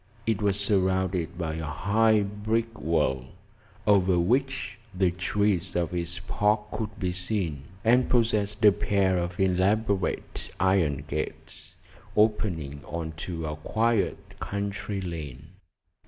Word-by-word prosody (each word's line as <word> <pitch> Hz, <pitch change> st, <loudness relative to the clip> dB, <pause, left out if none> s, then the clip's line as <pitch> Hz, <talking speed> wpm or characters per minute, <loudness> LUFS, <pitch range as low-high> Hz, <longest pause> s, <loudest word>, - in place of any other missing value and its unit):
It 110 Hz, -4 st, 0 dB
was 100 Hz, -1 st, +1 dB
surrounded 95 Hz, -4 st, +1 dB
by 80 Hz, -2 st, -2 dB
a 80 Hz, -, -4 dB
high 105 Hz, +6 st, +3 dB
brick 110 Hz, +3 st, -2 dB
wall, 75 Hz, -5 st, +1 dB, 0.6 s
over 95 Hz, -3 st, +4 dB
which 130 Hz, +8 st, 0 dB, 0.2 s
the 95 Hz, -2 st, +3 dB
trees 95 Hz, +1 st, 0 dB
of 85 Hz, -1 st, 0 dB
its 85 Hz, 0 st, -2 dB
park 105 Hz, +1 st, +1 dB
could 105 Hz, -1 st, -4 dB
be 90 Hz, -2 st, 0 dB
seen, 90 Hz, -6 st, -2 dB, 0.2 s
and 125 Hz, +2 st, +4 dB
possessed 110 Hz, -3 st, +2 dB
a 105 Hz, -, +10 dB
pair 100 Hz, -2 st, +1 dB
of 90 Hz, 0 st, -4 dB
elaborate 95 Hz, +2 st, +1 dB
iron 85 Hz, -8 st, +2 dB
gates, 75 Hz, +1 st, -5 dB, 0.4 s
opening 90 Hz, -10 st, +1 dB
on 85 Hz, -1 st, -4 dB
to 80 Hz, -1 st, -4 dB
a 75 Hz, 0 st, -3 dB
quiet 110 Hz, +5 st, 0 dB
country 100 Hz, 0 st, -3 dB
lane. 80 Hz, -8 st, -6 dB
95 Hz, 125 wpm, -27 LUFS, 85-105 Hz, 0.6 s, a